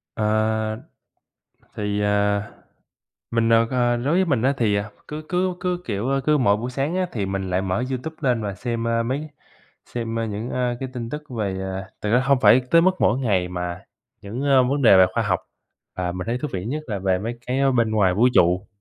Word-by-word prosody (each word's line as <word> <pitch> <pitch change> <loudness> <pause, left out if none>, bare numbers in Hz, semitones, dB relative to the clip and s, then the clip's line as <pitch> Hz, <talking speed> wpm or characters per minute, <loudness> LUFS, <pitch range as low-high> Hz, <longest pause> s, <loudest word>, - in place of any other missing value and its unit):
À, 110 0 0 1.0
thì, 105 0 -2
à, 105 0 +1 0.8
mình, 115 0 +2
à, 115 0 +5
à, 120 -1 +2
đối 135 +7 0
với 190 +1 +3
mình 140 -9 +1
á 135 +2 +2
thì, 110 -4 +2
à, 100 +1 -2 0.2
cứ 150 +1 -6
cứ 180 +1 +1
cứ, 180 -1 -1
kiểu, 110 +3 -2
a, 135 - +2
cứ 150 -1 +4
mỗi 105 -6 +3
buổi 120 +4 -4
sáng 140 +7 -2
á 185 -1 +1
thì 105 -4 -2
mình 95 -1 -3
lại 90 +1 +1
mở 95 +5 -1
Youtube 135 +5 -4
lên 125 -4 +1
và 100 -2 -3
xem, 115 -1 -3
a, 115 0 +1
mấy 140 +6 -3 0.6
xem, 115 -1 -4
a, 115 - -1
những, 110 +2 -4
a, 125 -1 -1
cái 130 - -4
tin 115 -2 -5
tức 150 +2 -5
về, 100 -6 -3
à 95 0 -5
thực 105 - -1
ra 125 - +5
hông 140 -1 +3
phải 125 0 +6
tới 165 0 +7
mức 185 +2 +4
mỗi 120 +5 +3
ngày 95 -8 +1
mà 90 0 -5 0.4
những, 110 +7 -5
a, 135 -2 +5
vấn 140 +3 0
đề 110 -6 +7
về 95 - +8
khoa 115 - +1
học, 90 -4 0 0.6
và 90 -1 -2
mình 90 +1 -5
thấy 120 +1 0
thú 150 - -3
vị 95 0 -3
nhất 150 +7 -3
là 105 -3 -3
về 95 -1 +1
mấy 115 +3 -4
cái, 130 +2 0
ơ, 135 -1 +3
bên 115 -3 +1
ngoài 95 -4 +3
vũ 115 +6 +4
trụ. 90 +3 +3
115 Hz, 230 wpm, -23 LUFS, 100-130 Hz, 1.0 s, về